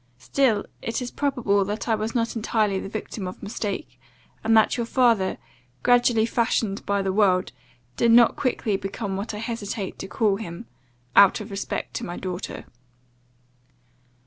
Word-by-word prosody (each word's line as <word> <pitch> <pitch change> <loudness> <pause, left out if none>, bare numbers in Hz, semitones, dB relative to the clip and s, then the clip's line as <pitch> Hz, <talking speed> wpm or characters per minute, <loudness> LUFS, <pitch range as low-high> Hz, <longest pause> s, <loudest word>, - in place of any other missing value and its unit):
Still 220 - +1 0.2
it 230 - -2
is 250 -1 -5
probable 240 -8 +1
that 210 +4 -4
I 225 - +2
was 220 +2 -2
not 230 0 0
entirely 215 -3 +1
the 195 - -6
victim 210 -2 -5
of 185 - -9
mistake; 205 +5 -4 0.4
and 225 0 +4
that 220 - +4
your 235 -2 -2
father, 230 -7 +2 0.5
gradually 245 -2 +4
fashioned 225 -3 0
by 200 0 +1
the 190 -1 -1
world, 185 -3 +3 0.5
did 235 - +4
not 235 0 +6
quickly 235 -6 0
become 195 +1 -4
what 210 +3 -4
I - - -5
hesitate 215 -3 -4
to - - -5
call 205 -1 +1
him 185 0 -7 0.5
out 200 -2 +7
of - - -8
respect 195 0 -4
to - - -5
my 175 - -5
daughter. 185 0 -5
215 Hz, 160 wpm, -24 LUFS, 195-230 Hz, 0.5 s, out